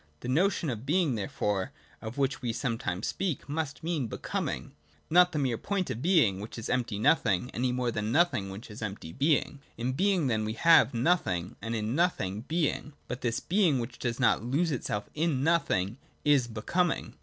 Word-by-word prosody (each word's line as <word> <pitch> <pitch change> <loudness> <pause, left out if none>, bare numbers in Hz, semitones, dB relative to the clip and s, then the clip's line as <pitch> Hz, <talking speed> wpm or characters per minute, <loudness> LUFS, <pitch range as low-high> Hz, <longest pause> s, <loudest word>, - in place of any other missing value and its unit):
The - - -6
notion 165 +2 +1
of 115 -1 -5
Being, 155 0 +2
therefore, 100 -2 -2 0.3
of 110 +3 -7
which 135 -1 0
we 120 -3 -1
some 115 -2 -2
times 90 +5 -3
speak, 180 -9 -2
must 150 0 -3
mean 160 -7 -1
Becoming; - - -4 0.4
not 180 +1 +6
the 155 - -3
mere 130 -5 0
point 195 -3 -1
of 115 - -4
Being, 150 - +3
which 105 +4 -8
is 115 - -4
empty 120 -4 0
Nothing, 110 - +2
any 125 +2 0
more 125 -1 0
than 105 0 -2
Nothing, 145 - +2
which 100 +3 -9
is 105 - -9
empty 100 -6 -5
Being. 145 0 +1 0.2
In 120 +2 -1
Being 185 +1 +2
then 110 -4 +1
we 110 0 -2
have 135 -2 +5
Nothing, 115 - +1
and 115 +3 -3
in 110 +1 -1
Nothing 125 - 0
Being: 155 -2 -1
but 125 - -5
this 115 -2 0
Being 180 -6 +2
which 115 0 -5
does 120 0 -2
not 120 -3 +3
lose 150 +8 +1
itself 105 -6 -3
in 155 -4 0
Nothing 135 - +1 0.3
is 140 -5 +4
Becoming. 165 +11 -1
125 Hz, 190 wpm, -29 LUFS, 110-160 Hz, 0.4 s, not